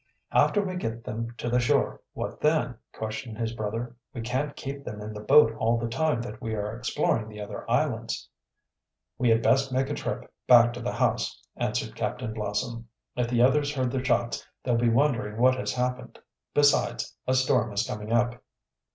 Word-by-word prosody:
"After 205 Hz, -, +4 dB
we 185 Hz, -2 st, -3 dB
get 115 Hz, -7 st, -4 dB
them 115 Hz, +2 st, -4 dB
to 115 Hz, -, -4 dB
the 120 Hz, +1 st, +2 dB
shore, 120 Hz, -, +1 dB
what -, -, -5 dB
then?" 150 Hz, -5 st, +2 dB, 0.2 s
questioned 110 Hz, 0 st, -5 dB
his 115 Hz, 0 st, -2 dB
brother. 115 Hz, +2 st, -4 dB, 0.2 s
"We 120 Hz, -, -3 dB
can't 130 Hz, +5 st, -2 dB
keep 140 Hz, +1 st, -6 dB
them 105 Hz, -6 st, -6 dB
in 105 Hz, +1 st, -6 dB
the 105 Hz, -, -6 dB
boat 115 Hz, +2 st, +6 dB
all 115 Hz, +1 st, +2 dB
the 115 Hz, 0 st, -2 dB
time 130 Hz, 0 st, 0 dB
that 110 Hz, 0 st, -8 dB
we 110 Hz, -2 st, -2 dB
are 105 Hz, +1 st, -3 dB
exploring 115 Hz, -2 st, 0 dB
the 105 Hz, -1 st, -10 dB
other 105 Hz, -, -7 dB
islands." -, -, 0 dB, 0.9 s
"We 125 Hz, -, +3 dB
had 115 Hz, 0 st, +4 dB
best 135 Hz, 0 st, +3 dB
make 130 Hz, +1 st, 0 dB
a -, -, 0 dB
trip -, -, -4 dB
back 120 Hz, -1 st, +7 dB
to 120 Hz, -, -7 dB
the 120 Hz, -, -2 dB
house," -, -, 0 dB, 0.2 s
answered -, -, -2 dB
Captain 120 Hz, -3 st, -3 dB
Blossom. 115 Hz, +2 st, -3 dB, 0.3 s
"If 125 Hz, -1 st, 0 dB
the 120 Hz, 0 st, +3 dB
others 145 Hz, +3 st, +3 dB
heard 130 Hz, -2 st, 0 dB
the 130 Hz, 0 st, -1 dB
shots 120 Hz, -3 st, +1 dB, 0.2 s
they'll 125 Hz, -, +1 dB
be 120 Hz, 0 st, +3 dB
wondering 115 Hz, -4 st, +1 dB
what 130 Hz, +1 st, +6 dB
has 130 Hz, -, -2 dB
happened; 125 Hz, 0 st, -2 dB, 0.4 s
besides, 145 Hz, 0 st, +3 dB
a 130 Hz, -, +3 dB
storm 130 Hz, -3 st, +2 dB
is 100 Hz, -, 0 dB
coming 105 Hz, +1 st, -5 dB
up." 120 Hz, +1 st, +1 dB
120 Hz, 190 wpm, -27 LUFS, 110-130 Hz, 0.9 s, back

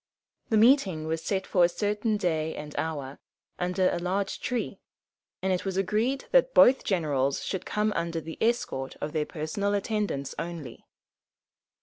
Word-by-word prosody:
The 220 Hz, -, +3 dB
meeting 210 Hz, -, +4 dB
was 160 Hz, 0 st, -2 dB
set 190 Hz, +2 st, -1 dB
for 180 Hz, -, +3 dB
a 170 Hz, -, +5 dB
certain 210 Hz, +3 st, 0 dB
day 160 Hz, -5 st, -1 dB
and 150 Hz, 0 st, -8 dB
hour, 145 Hz, -4 st, -3 dB, 0.4 s
under 180 Hz, +1 st, +1 dB
a 175 Hz, -, -1 dB
large 190 Hz, +3 st, -1 dB
tree, 245 Hz, -2 st, -3 dB, 0.6 s
and 190 Hz, 0 st, +2 dB
it 180 Hz, -, -1 dB
was 190 Hz, -1 st, -3 dB
agreed 215 Hz, +8 st, 0 dB
that -, -, +4 dB
both 265 Hz, +2 st, +7 dB
generals 145 Hz, -7 st, 0 dB
should 190 Hz, -, -3 dB
come 210 Hz, 0 st, 0 dB
under 170 Hz, 0 st, -1 dB
the 160 Hz, 0 st, -8 dB
escort 220 Hz, -, 0 dB
of 150 Hz, -, -4 dB
their 155 Hz, -2 st, 0 dB
personal 200 Hz, +6 st, -2 dB
attendants 200 Hz, -9 st, -2 dB
only. 165 Hz, -8 st, -7 dB
185 Hz, 155 wpm, -28 LUFS, 160-210 Hz, 0.6 s, both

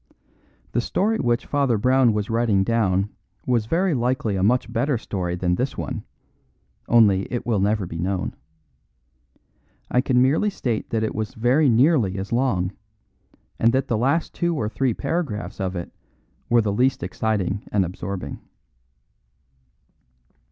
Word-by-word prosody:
The 120 Hz, -, +1 dB
story 215 Hz, -, 0 dB
which 120 Hz, -2 st, 0 dB
Father 140 Hz, -5 st, +1 dB
Brown 130 Hz, +2 st, +4 dB
was 105 Hz, -1 st, -1 dB
writing 110 Hz, -4 st, +2 dB
down 100 Hz, -2 st, +1 dB, 0.3 s
was 120 Hz, -4 st, +1 dB
very 180 Hz, +5 st, +1 dB
likely 120 Hz, -4 st, 0 dB
a 95 Hz, -, -1 dB
much 115 Hz, +3 st, +1 dB
better 125 Hz, +3 st, +1 dB
story 90 Hz, -6 st, -3 dB
than 90 Hz, 0 st, 0 dB
this 125 Hz, +9 st, -2 dB
one, -, -, -4 dB, 0.8 s
only 105 Hz, -5 st, +4 dB
it 120 Hz, -2 st, -3 dB
will 115 Hz, -4 st, +1 dB
never 100 Hz, 0 st, +1 dB
be 85 Hz, -1 st, -6 dB
known. 90 Hz, +1 st, -2 dB, 1.6 s
I 125 Hz, -, +3 dB
can 125 Hz, -2 st, +2 dB
merely 140 Hz, +11 st, +3 dB
state 120 Hz, -, -3 dB
that 110 Hz, -2 st, 0 dB
it 110 Hz, -, -1 dB
was 110 Hz, -1 st, -4 dB
very 130 Hz, +6 st, +3 dB
nearly 120 Hz, -, +3 dB
as 95 Hz, +1 st, -5 dB
long, 115 Hz, -8 st, +1 dB, 0.9 s
and 115 Hz, -, +4 dB
that 135 Hz, 0 st, 0 dB
the 115 Hz, -, +2 dB
last 135 Hz, +9 st, 0 dB
two 170 Hz, -1 st, 0 dB
or 110 Hz, -8 st, -1 dB
three 125 Hz, +1 st, 0 dB
paragraphs 140 Hz, -9 st, -3 dB
of 95 Hz, -1 st, -2 dB
it 85 Hz, -, -5 dB, 0.6 s
were 120 Hz, -1 st, +5 dB
the 100 Hz, -2 st, 0 dB
least 125 Hz, -1 st, +1 dB
exciting 100 Hz, +1 st, -1 dB
and 100 Hz, -3 st, +2 dB
absorbing. 95 Hz, +2 st, -5 dB
115 Hz, 150 wpm, -23 LUFS, 100-130 Hz, 1.6 s, were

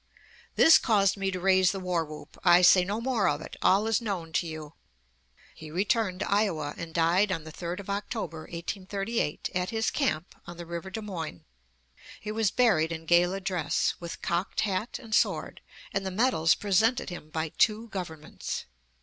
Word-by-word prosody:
This 325 Hz, -, +8 dB
caused 200 Hz, -4 st, +3 dB
me 195 Hz, -1 st, -1 dB
to 185 Hz, -1 st, -3 dB
raise 190 Hz, 0 st, +4 dB
the 195 Hz, -, -4 dB
war 180 Hz, -3 st, 0 dB
whoop. 150 Hz, -1 st, -11 dB
I 175 Hz, -1 st, +6 dB
say 180 Hz, +1 st, +7 dB
no 200 Hz, +4 st, -2 dB
more 235 Hz, -4 st, +1 dB
of 145 Hz, 0 st, -1 dB
it; -, -, -9 dB
all 200 Hz, +3 st, +4 dB
is 225 Hz, +1 st, +1 dB
known 180 Hz, -8 st, -4 dB
to 170 Hz, -, 0 dB
you." 155 Hz, -1 st, -7 dB, 0.8 s
He 155 Hz, -, -11 dB
returned 190 Hz, +2 st, 0 dB
to -, -, -1 dB
Iowa, 175 Hz, -8 st, +1 dB
and 170 Hz, -1 st, -7 dB
died 175 Hz, +5 st, +2 dB
on 165 Hz, -4 st, -2 dB
the 160 Hz, -, -9 dB
3d 175 Hz, +3 st, -5 dB
of 195 Hz, -, -15 dB
October, 200 Hz, -4 st, -4 dB
1838, 195 Hz, +1 st, -3 dB
at 180 Hz, 0 st, -1 dB
his 225 Hz, 0 st, 0 dB
camp 180 Hz, -, -1 dB
on 175 Hz, 0 st, -9 dB
the 170 Hz, -, -7 dB
river 170 Hz, +2 st, -6 dB
Des 220 Hz, +4 st, -5 dB
Moines. 165 Hz, -, -6 dB, 0.8 s
He 210 Hz, -, -5 dB
was 220 Hz, -2 st, +1 dB
buried 180 Hz, -9 st, +3 dB
in 165 Hz, -1 st, -5 dB
gala 175 Hz, +3 st, +3 dB
dress, 180 Hz, -2 st, 0 dB
with 170 Hz, -1 st, -8 dB
cocked 175 Hz, +2 st, -1 dB
hat 205 Hz, +2 st, -2 dB
and 225 Hz, -4 st, -10 dB
sword, -, -, +1 dB, 0.3 s
and 195 Hz, -, -1 dB
the 190 Hz, -, -2 dB
medals 185 Hz, -5 st, +3 dB
presented 210 Hz, +3 st, +1 dB
him 165 Hz, -3 st, -8 dB
by 160 Hz, 0 st, -2 dB
two 220 Hz, +6 st, +1 dB
governments. 160 Hz, -6 st, -6 dB
185 Hz, 185 wpm, -28 LUFS, 165-210 Hz, 0.8 s, This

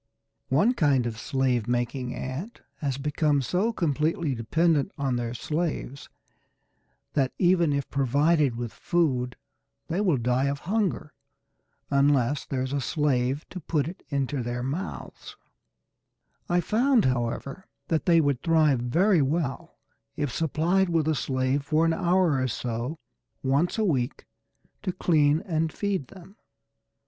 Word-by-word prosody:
One 180 Hz, -, +3 dB
kind 140 Hz, -, +2 dB
of 110 Hz, -2 st, -4 dB
slave 130 Hz, -4 st, 0 dB
making 120 Hz, +1 st, -2 dB
ant 145 Hz, -, -6 dB, 0.2 s
has 140 Hz, -3 st, -2 dB
become 145 Hz, 0 st, +1 dB
so 185 Hz, -, 0 dB
completely 155 Hz, -, 0 dB
dependent 155 Hz, -, +1 dB
on 135 Hz, -3 st, 0 dB
their 120 Hz, 0 st, -3 dB
slaves 150 Hz, -1 st, -3 dB, 1.0 s
that 135 Hz, -3 st, +1 dB
even 175 Hz, -3 st, +3 dB
if 140 Hz, -1 st, -1 dB
provided 140 Hz, +1 st, +2 dB
with 120 Hz, -1 st, -5 dB
food 130 Hz, -8 st, 0 dB, 0.5 s
they 175 Hz, +5 st, 0 dB
will 180 Hz, -9 st, +2 dB
die 125 Hz, +2 st, +1 dB
of 140 Hz, 0 st, -2 dB
hunger, 190 Hz, -5 st, -1 dB, 0.8 s
unless 140 Hz, -1 st, +2 dB
there 130 Hz, -2 st, -1 dB
is 130 Hz, +1 st, -4 dB
a 140 Hz, -, 0 dB
slave 135 Hz, 0 st, 0 dB
to 185 Hz, -, -6 dB
put 150 Hz, -3 st, -1 dB
it 175 Hz, -, -8 dB
into 140 Hz, -1 st, -1 dB
their 120 Hz, +1 st, -3 dB
mouths, 150 Hz, +9 st, -6 dB, 1.1 s
I 175 Hz, 0 st, +3 dB
found, 235 Hz, -, +3 dB
however, 130 Hz, +6 st, -2 dB, 0.2 s
that 160 Hz, -2 st, 0 dB
they 170 Hz, -1 st, +6 dB
would 140 Hz, -4 st, 0 dB
thrive 155 Hz, -6 st, +3 dB
very 170 Hz, -, +3 dB
well 140 Hz, -2 st, -2 dB, 0.4 s
if 145 Hz, -4 st, -2 dB
supplied 170 Hz, +4 st, +1 dB
with 165 Hz, -3 st, +1 dB
a 160 Hz, -, +3 dB
slave 130 Hz, 0 st, 0 dB
for 155 Hz, +3 st, +2 dB
an 165 Hz, -, +2 dB
hour 170 Hz, -5 st, +2 dB
or 130 Hz, -, +1 dB
so 120 Hz, +5 st, -3 dB, 0.5 s
once 140 Hz, +9 st, +1 dB
a 220 Hz, -, +2 dB
week 135 Hz, -7 st, -1 dB, 0.6 s
to 190 Hz, -, -2 dB
clean 155 Hz, -3 st, +3 dB
and 160 Hz, -2 st, -1 dB
feed 195 Hz, -9 st, -2 dB
them. 190 Hz, +2 st, -15 dB
145 Hz, 140 wpm, -26 LUFS, 130-170 Hz, 1.1 s, they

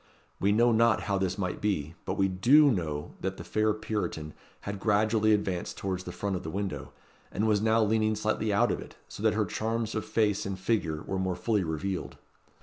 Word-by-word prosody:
We 100 Hz, -, +2 dB
know 120 Hz, +3 st, +4 dB
not 115 Hz, 0 st, +4 dB
how 100 Hz, -1 st, -1 dB
this 95 Hz, 0 st, -1 dB
might 90 Hz, -3 st, -3 dB
be; 80 Hz, -7 st, -1 dB
but -, -, -2 dB
we 95 Hz, -, +3 dB
do 130 Hz, +11 st, +5 dB
know 75 Hz, -8 st, -3 dB
that 95 Hz, 0 st, -3 dB
the -, -, -7 dB
fair 110 Hz, 0 st, +1 dB
Puritan 105 Hz, -8 st, -3 dB, 0.3 s
had 100 Hz, -1 st, -5 dB
gradually 110 Hz, +1 st, +2 dB
advanced 95 Hz, -4 st, -1 dB
towards 95 Hz, -1 st, -3 dB
the 90 Hz, -, -5 dB
front 100 Hz, +2 st, -2 dB
of 90 Hz, -, -3 dB
the 80 Hz, -, -6 dB
window, 100 Hz, +2 st, -4 dB, 0.4 s
and 110 Hz, -, 0 dB
was 105 Hz, -2 st, +3 dB
now 110 Hz, +1 st, +3 dB
leaning 110 Hz, 0 st, +2 dB
slightly 110 Hz, 0 st, 0 dB
out 100 Hz, -, +3 dB
of -, -, -2 dB
it, -, -, -11 dB
so -, -, -9 dB
that -, -, +2 dB
her -, -, +2 dB
charms 115 Hz, 0 st, -2 dB
of 110 Hz, -, -2 dB
face 105 Hz, -2 st, +1 dB
and 100 Hz, -1 st, -4 dB
figure 90 Hz, -6 st, -1 dB
were 95 Hz, -, -3 dB
more 95 Hz, -1 st, -1 dB
fully 105 Hz, -1 st, 0 dB
revealed. 90 Hz, +4 st, -3 dB
100 Hz, 210 wpm, -29 LUFS, 95-110 Hz, 0.4 s, do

